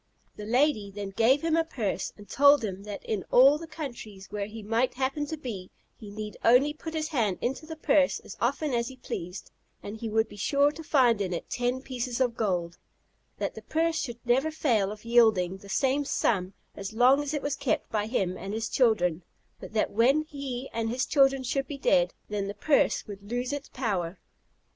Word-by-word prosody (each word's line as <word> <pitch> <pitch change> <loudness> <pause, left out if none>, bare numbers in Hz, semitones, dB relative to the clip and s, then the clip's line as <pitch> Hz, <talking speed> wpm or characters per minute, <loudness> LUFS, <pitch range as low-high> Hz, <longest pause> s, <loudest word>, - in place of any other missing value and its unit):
The 210 - -7
lady 245 -4 +2
then 200 0 -6
gave 235 +9 +3
him 325 -1 +2
a 330 - +3
purse, 245 -11 -3
and 205 -1 -13
told 285 -1 +5
him 195 -2 -4
that 205 -1 -7
in 210 -4 -2
all 275 +4 +6
the 330 - -8
countries 235 -11 -8
where 205 -1 -3
he 220 0 -9
might 230 +4 0
happen 270 +3 -1
to 315 - -4
be, 210 -10 -6 0.3
he 215 - -11
need 210 +1 -7
only 255 +5 +5
put 320 +1 -7
his 310 0 -2
hand 225 - 0
into 270 +5 -3
the 320 - -6
purse 290 -2 +2
as - - -10
often 280 +4 0
as 235 0 0
he 265 - -8
pleased, 180 -6 -6 0.3
and 205 - -6
he 225 0 -4
would 220 +1 +2
be - - -13
sure 280 +7 +3
to 325 - -9
find 245 -8 +3
in 185 -2 -1
it 170 - -6
ten 245 +2 -1
pieces 250 -2 -4
of 245 -3 +1
gold; 180 -7 -1 0.6
that - - -2
the - - -9
purse 325 0 0
should 240 -2 -5
never 260 +6 +2
fail 235 -11 +1
of 215 +1 -10
yielding 220 -6 +4
the 200 +1 -14
same 270 +7 +1
sum 195 -8 0 0.2
as 195 +1 -6
long 255 +5 +5
as 290 -1 -3
it 290 - -3
was 285 -1 -1
kept 255 - -1
by 210 -1 0
him 190 -6 -1
and 195 +3 -5
his 225 0 -2
children; 180 -9 +2 0.4
but - - -10
that 215 - +1
when 260 +8 +3
he 275 -4 -6
and 225 0 -1
his 250 +2 0
children 270 -2 +3
should 270 +2 -1
be 290 - -6
dead, 180 -9 +3 0.2
then 205 -1 -2
the 200 - -5
purse 285 +7 +2
would 200 -1 -10
lose 245 +3 -1
its 285 0 -5
power. 195 -8 -2
240 Hz, 210 wpm, -28 LUFS, 205-275 Hz, 0.6 s, all